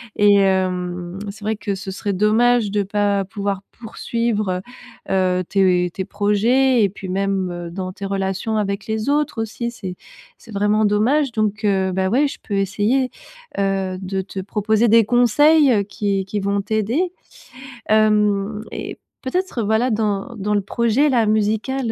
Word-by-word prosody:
Et 205 0 +5
hem, 180 -2 0
c'est 205 +1 -10
vrai 220 -1 -1
que 200 -2 -3
ce 190 0 -6
serait 200 +1 -3
dommage, 215 +2 +3
de 205 0 +1
pas 200 0 0
pouvoir 200 -1 -3 0.2
poursuivre, 215 -4 -2 0.5
heu - - -3 0.3
heu, - - -4
tes 180 -3 +2
tes 190 - -4
projets 225 +6 +2
et 200 - +3
puis 190 -1 -9
même, 195 -1 -1
heu, 175 -1 -6
dans 185 +1 -5
tes 200 - -7
relations 195 +2 -2
avec 200 0 -2
les 220 +4 -2
autres 290 -5 0
aussi, 235 +2 -4
c'est 190 -6 -7 0.4
c'est 225 - -16
vraiment 210 +2 +2
dommage. 240 +7 +2
Donc, 215 -1 -1
heu, 190 -2 +1
bah, 190 0 0
ouais, 275 +7 +3
je - - -7
peux 205 - -4
essayer, 210 +7 +1 0.5
heu, 195 -1 -1
de 190 0 -2
te 190 0 -7
proposer 215 +3 +1
des 225 0 +6
conseils, 270 +6 +4
heu, 205 - +2
qui 200 -1 -2
qui 205 +2 -3
vont 200 +1 0
t'aider. 225 - -1 0.8
Hem 210 -1 +2
et - - -6 0.2
peut-être 360 0 -2
heu, - - -1
voilà 220 +4 +2
dans 210 0 -1
dans 210 +1 -1
le 205 - +3
projet 235 +8 +1
là 235 -4 +3
musical, 220 +4 0
205 Hz, 165 wpm, -20 LUFS, 195-225 Hz, 0.8 s, des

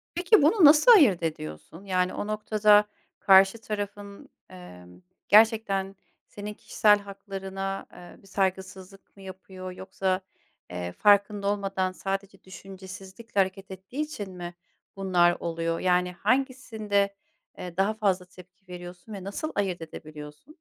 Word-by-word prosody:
Peki, 355 +3 +4
bunu 325 +4 +5
nasıl 300 +10 +7
ayırt 255 - +6
ediyorsun? 155 - -6
Yani, 185 -1 0
o 205 - -4
noktada 210 0 +3 0.3
karşı 195 +2 +6
tarafın, 205 -1 -6 0.2
emm, 90 0 -14 0.3
gerçekten 205 -3 +3 0.3
senin 210 0 -8
kişisel 210 0 +2
haklarına, 195 -1 -6
eee, 175 - -14
bir 195 - -20
saygısızlık 190 0 -4
mı 195 - -14
yapıyor 185 -1 -9
yoksa, 190 0 -2 0.5
eee, 90 0 -5
farkında 205 - +3
olmadan 195 -2 -1
sadece 195 +1 -5
düşüncesizlikle 190 +3 -8
hareket 190 0 -1
ettiği 190 +10 -6
için 215 -11 -5
mi 175 0 -7 0.4
bunlar 180 -3 +2
oluyor? 165 0 -2
Yani, 180 0 +1
hangisinde, 220 -5 -1 0.4
eee, 180 -1 -8
daha 200 +3 +2
fazla 195 -4 0
tepki 180 +1 -18
veriyorsun 175 +3 -10
ve 195 -2 -7
nasıl 205 +11 -5
ayırt 190 -4 -1
edebiliyorsun? 155 - -11
195 Hz, 125 wpm, -26 LUFS, 180-205 Hz, 0.5 s, nasıl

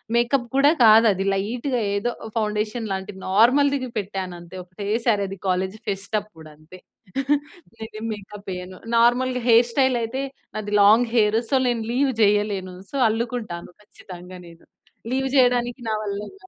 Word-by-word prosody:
Makeup 240 +1 +1
కూడా 280 +2 +5
కాదు 220 +1 +7
అది 190 0 -3
లైట్‌గా 235 +6 -2
ఏదో 205 +4 -1 0.3
ఫౌండేషన్ 215 +1 -2
లాంటి 190 +1 -5
నార్మల్‌ 245 +9 +4
ది‌గ్ 260 -2 -3
పెట్టాను 190 -2 -5
అంతే 175 +2 -11
ఒకటేసారి 205 +4 -1
అది 195 +1 -7
కాలేజ్ 185 +2 0
ఫెస్ట్ 200 +2 -2
అప్పుడు 165 -7 -15
అంతే. 155 +4 -15 1.0
నేనేం 220 0 -8
మేకప్ 205 0 -11
వేయను 180 0 -7 0.2
నార్మల్‌గా 250 +1 +2
హెయిర్ 235 +1 +6
స్టైల్ 260 0 +2
అయితే 245 +4 -3 0.3
నాది 210 -1 -4
లాంగ్ 225 +4 +5
హెయిర్ 215 -1 +3
సో - - +3
నేను 235 -2 0
లీవ్ 270 +2 +2
చేయలేను 205 -3 +1 0.2
సో - - -8
అల్లుకుంటాను 225 -6 -4
ఖచ్చితంగా 180 -2 -12
నేను. 165 0 -16 0.5
లీవ్ 265 +1 0
చేయడానికి 245 -1 +2
నా - - 0
వ‌ల్లగా 210 - -7
215 Hz, 145 wpm, -23 LUFS, 195-245 Hz, 1.0 s, కాదు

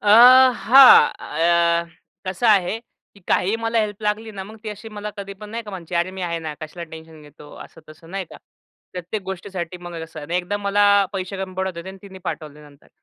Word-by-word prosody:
अ, 210 - -2 0.6
हां 265 +2 +9
अ, 170 0 +1 0.4
कसं 185 +5 -1
आहे 205 0 +3 0.4
की 200 - -19
काहीही 200 +5 +1
मला 230 0 -1
हेल्प 210 0 -4
लागली 215 +1 -2
ना, 190 -1 -7
मग 215 +2 -12
ती 215 - -4
अशी 210 +2 -8
मला 210 -1 -6
कधीपण 200 +1 -8
नाही 230 +1 -5
का 210 - -10
म्हणते, 175 -2 -8
"अरे 175 +2 0
मी 190 -1 -7
आहे 170 -1 -2
ना! 150 - -4
कशाला 170 +2 -7
टेन्शन 160 -1 -12
घेतो?" 145 0 -15
असं-तसं 160 +1 -16
नाही 195 -1 -4
का. - - -11 0.6
प्रत्येक 180 +3 -5
गोष्टीसाठी 185 -2 -6
मग 170 -1 -7
कसं, 160 -1 -10
1दा 180 +3 -1
मला 205 +1 +3 0.3
पैसे 190 0 -4
कमी 190 -1 -6
पडत 190 -1 -3
होते 170 +2 -7
आणि 190 0 -10
तिने 190 -1 -12
पाठवले 150 -2 -7
नंतर. 145 0 -22
190 Hz, 200 wpm, -21 LUFS, 170-205 Hz, 0.6 s, हां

